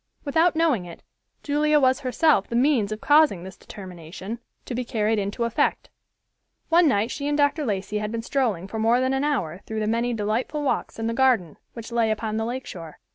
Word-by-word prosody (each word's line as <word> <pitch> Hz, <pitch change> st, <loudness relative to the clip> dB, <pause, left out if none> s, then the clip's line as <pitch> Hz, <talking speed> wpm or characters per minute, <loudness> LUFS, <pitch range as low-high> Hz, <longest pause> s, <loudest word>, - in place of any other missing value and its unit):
Without 320 Hz, +4 st, +2 dB
knowing 310 Hz, -, +2 dB
it, 170 Hz, -1 st, -11 dB, 0.4 s
Julia 300 Hz, +1 st, +2 dB
was 260 Hz, -1 st, +3 dB
herself 275 Hz, -, +2 dB
the 235 Hz, -, -4 dB
means 245 Hz, -5 st, +2 dB
of 215 Hz, -, -5 dB
causing 295 Hz, -, +4 dB
this 190 Hz, +1 st, -9 dB
determination 185 Hz, +3 st, -9 dB, 0.3 s
to -, -, -5 dB
be 250 Hz, +1 st, -2 dB
carried 220 Hz, -2 st, 0 dB
into 200 Hz, +4 st, -2 dB
effect. 235 Hz, -1 st, 0 dB, 0.8 s
One 340 Hz, 0 st, +5 dB
night 220 Hz, -4 st, +1 dB
she 285 Hz, -1 st, -4 dB
and 295 Hz, 0 st, 0 dB
Dr. 290 Hz, +1 st, +2 dB
Lacey 210 Hz, -1 st, -2 dB
had 210 Hz, 0 st, -3 dB
been 230 Hz, 0 st, -3 dB
strolling 225 Hz, -9 st, -1 dB
for 220 Hz, +3 st, -5 dB
more 230 Hz, +3 st, +3 dB
than 260 Hz, +1 st, +1 dB
an 270 Hz, +1 st, 0 dB
hour 190 Hz, -, -1 dB
through 220 Hz, 0 st, -3 dB
the -, -, 0 dB
many 230 Hz, +3 st, 0 dB
delightful 225 Hz, +8 st, -2 dB
walks 280 Hz, -, -1 dB
in 225 Hz, -, -3 dB
the 230 Hz, -, -1 dB
garden, 230 Hz, -, +2 dB, 0.2 s
which 230 Hz, 0 st, -9 dB
lay 230 Hz, -1 st, +2 dB
upon 215 Hz, 0 st, -2 dB
the 225 Hz, -, -1 dB
lake 255 Hz, +3 st, -4 dB
shore. 165 Hz, -4 st, -9 dB
230 Hz, 205 wpm, -24 LUFS, 210-280 Hz, 0.8 s, One